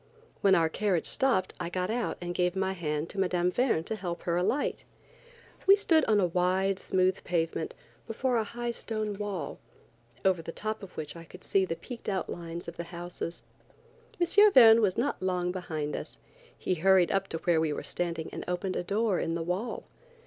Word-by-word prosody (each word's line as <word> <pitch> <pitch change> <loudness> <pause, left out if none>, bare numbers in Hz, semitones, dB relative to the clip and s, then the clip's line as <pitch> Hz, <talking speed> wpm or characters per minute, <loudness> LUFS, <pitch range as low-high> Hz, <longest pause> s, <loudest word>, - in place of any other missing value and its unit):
When 195 -1 +5
our 165 -1 +4
carriage 185 0 0
stopped 240 -9 +1
I 170 -1 -3
got 180 +2 -2
out 235 -1 -1
and 175 0 -4
gave 180 +1 +1
my 190 0 0
hand 155 -3 -2
to 200 - -5
Mme. 180 -1 +1
Verne 245 -8 +1
to 220 - -3
help 175 -4 -5
her 170 - 0
alight. 185 +11 0 0.8
We 395 - +9
stood 330 -6 +3
on 215 -2 +3
a 190 - +4
wide, 185 +2 +1
smooth 185 0 +1
pavement, 165 -2 -1 0.3
before 245 +2 0
a 225 - +2
high 240 +2 -4
stone 215 -3 -4
wall, 205 -2 -4 0.7
over 185 -3 +3
the 165 - -6
top 215 +5 -3
of 195 -2 -11
which 150 0 -5
I 165 - -9
could 180 +3 -14
see 195 -1 +2
the 165 - -3
peaked 235 +5 -7
outlines 170 -3 -4
of 170 - -7
the 170 - -4
house. 175 +1 -9
M. 360 - 0
Verne 230 - +8
was 195 -4 +2
not 270 +5 -1
long 180 -1 0
behind 155 -5 -3
us. - - -7 0.4
He - - -1
hurried 185 0 +4
up 195 0 +1
to 165 - -3
where 165 -1 +2
we 160 -1 +1
were - - -4
standing 170 -2 -3
and - - -5
opened 180 +1 -2
a - - -1
door 205 +1 +1
in 165 - -1
the 165 - -2
wall. 185 +8 -3
185 Hz, 195 wpm, -29 LUFS, 170-215 Hz, 0.8 s, We